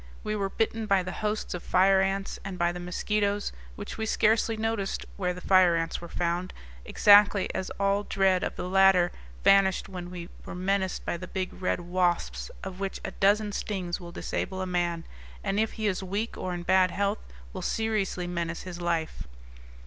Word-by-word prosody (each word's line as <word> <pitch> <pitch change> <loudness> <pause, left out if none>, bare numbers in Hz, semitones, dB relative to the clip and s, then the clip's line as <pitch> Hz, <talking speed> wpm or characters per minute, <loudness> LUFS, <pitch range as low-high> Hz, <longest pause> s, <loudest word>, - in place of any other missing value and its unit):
We 215 - -2
were 200 -2 -1
bitten 225 +1 -1
by 195 -2 +3
the 185 - -5
hosts 210 +3 -2
of 180 - -4
fire 190 +1 +4
ants, 195 +1 -1
and 195 -2 -6
by 175 -1 +2
the 175 - -6
mosquitoes, 205 +3 -1 0.2
which - - -7
we 220 - -1
scarcely 220 +1 +2
noticed 220 -3 -2
where 180 -3 -1
the 180 0 -7
fire 185 -3 +5
ants 165 0 -2
were 170 - -7
found, 175 +2 -2 0.3
exactly 205 -1 +5
as 190 - -3
all 200 0 +2
dread 190 -1 +2
of - - -2
the 180 - -4
latter 190 -2 +5 0.3
vanished 195 -1 +4
when 180 -2 -7
we 175 -1 -7
were - - -7
menaced 190 +1 -1
by - - -1
the 185 - -8
big 185 0 -3
red 180 - -1
wasps, 175 - 0
of 190 -1 -6
which 195 -1 -3
a 195 - -4
dozen 205 +2 +2
stings 185 -3 -3
will 175 -2 -9
disable 190 +2 -3
a 185 - -1
man, 175 -2 -1 0.4
and 200 - 0
if 220 0 0
he 220 - -4
is 200 -3 0
weak 200 +4 -3
or 185 - -4
in 175 -1 -4
bad 185 +1 +4
health 200 +3 -1 0.3
will - - -5
seriously 215 -5 -1
menace 170 -1 -3
his 180 -1 -7
life. 165 - -2
190 Hz, 190 wpm, -28 LUFS, 180-200 Hz, 0.4 s, fire